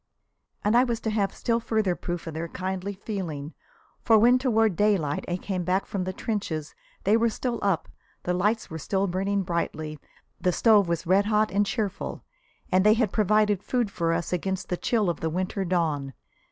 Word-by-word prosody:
And 210 +2 +2
I 245 - +6
was 235 -3 -1
to 220 - -1
have 205 -2 +1
still 230 -1 0
further 220 -5 0
proof 175 -1 -5
of 165 - -5
their 160 +2 -3
kindly 185 +3 -4
feeling, 170 -8 -5 0.5
for 225 -2 +5
when 245 +4 +5
toward 225 -6 +2
daylight 185 -8 +1
I 175 - -1
came 185 -1 -3
back 185 +3 +1
from 190 -3 -3
the 185 - -2
trenches 185 -7 -3 0.3
they 205 +3 +4
were 230 +1 +3
still 235 +1 -3
up, 195 -5 0 0.4
the 180 - 0
lamps 210 +5 +1
were 160 - -5
still 195 +6 0
burning 195 +2 0
brightly, 160 -3 -3 0.4
the 180 - +2
stove 210 0 +4
was 170 -1 -1
red 190 +4 +4
hot 215 -1 +2
and 205 +2 +2
cheerful, 205 -4 -3 0.5
and 185 0 +4
they 210 +1 +6
had 225 -4 +1
provided 210 -1 +3
food 240 -4 -1
for 165 -3 0
us 170 +2 -1
against 190 +2 -2
the 180 - 0
chill 220 -1 +1
of 170 -4 -1
the 160 - -1
winter 185 +4 -2
dawn. 160 -7 -1
195 Hz, 195 wpm, -26 LUFS, 175-215 Hz, 0.5 s, I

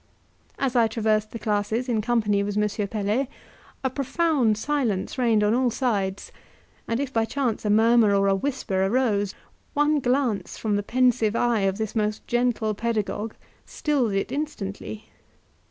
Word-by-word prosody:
As 265 -3 -1
I 235 -2 +5
traversed 215 -1 0
the - - -6
classes 215 +3 -1
in 230 -3 +1
company 210 -3 +1
with 205 0 -2
M. 210 0 0
Pelet, 215 +6 -1 0.6
a 265 - +1
profound 275 -4 +1
silence 245 -5 -1
reigned 225 -4 +3
on 210 +1 +3
all 250 +1 +2
sides, 205 -6 -2 0.6
and 230 +1 -1
if 275 -1 -3
by 225 - +2
chance 235 -2 -2
a - - +1
murmur 220 0 +5
or 195 0 +3
a 195 - +4
whisper 195 -3 -1
arose, 205 -2 +1 0.4
one 295 +1 +3
glance 245 -7 0
from 215 -2 -1
the 205 - +1
pensive 240 -1 +2
eye 240 -2 +2
of 190 - -4
this 220 0 -3
most 210 -1 -1
gentle 240 -3 0
pedagogue 215 0 -2 0.3
stilled 270 -8 0
it 195 +4 -1
instantly. 220 -7 -5
225 Hz, 155 wpm, -25 LUFS, 210-250 Hz, 0.6 s, I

